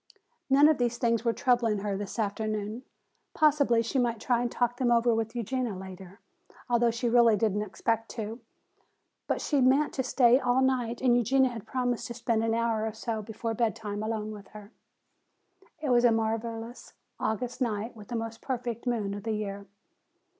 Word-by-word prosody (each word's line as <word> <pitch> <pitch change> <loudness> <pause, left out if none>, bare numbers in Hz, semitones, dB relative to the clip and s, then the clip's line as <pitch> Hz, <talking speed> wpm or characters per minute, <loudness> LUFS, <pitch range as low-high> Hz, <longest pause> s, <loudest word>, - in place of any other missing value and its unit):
None 280 +2 +6
of 310 -3 +3
these 240 -1 0
things 230 -2 +1
were 235 - +2
troubling 240 -3 +1
her 205 -1 -2
this 200 +2 -5
afternoon. 215 +1 -2 0.5
Possibly 285 -7 +3
she 245 +4 -1
might 235 -2 0
try 240 +1 +1
and 240 -1 -1
talk 245 0 0
them 250 -1 +1
over 235 0 +4
with 225 +1 -2
Eugenia 240 -1 -2
later, 190 +1 -10 0.5
although 240 -1 +3
she 235 +2 -2
really 235 -2 +5
did 210 -1 +1
not 210 0 -1
expect 225 +3 -1
to. 220 +2 -4 0.9
But - - -1
she 285 -3 +1
meant 270 +4 +3
to 265 - -1
stay 250 -1 +4
all 255 0 +2
night 245 -3 0
and 250 -2 +4
Eugenia 255 +2 +3
had 225 -2 -8
promised 245 -1 -1
to 235 - -7
spend 230 -1 0
an 225 0 +1
hour 230 -2 0
or 220 - -4
so 220 0 -3
before 225 +2 -4
bedtime 215 -2 -2
alone 215 -1 -3
with 205 -2 -10
her. 210 0 -12 1.1
It 300 -2 -3
was 240 0 +4
a 240 - +6
marvelous 225 +1 -3 0.3
August 245 +4 -2
night 225 -1 -2
with 210 -2 -12
the 240 - -5
most 225 0 -4
perfect 245 -2 -4
moon 215 -5 -1
of 205 - -6
the 225 +2 -2
year. 200 -1 -4
230 Hz, 185 wpm, -28 LUFS, 215-245 Hz, 1.1 s, None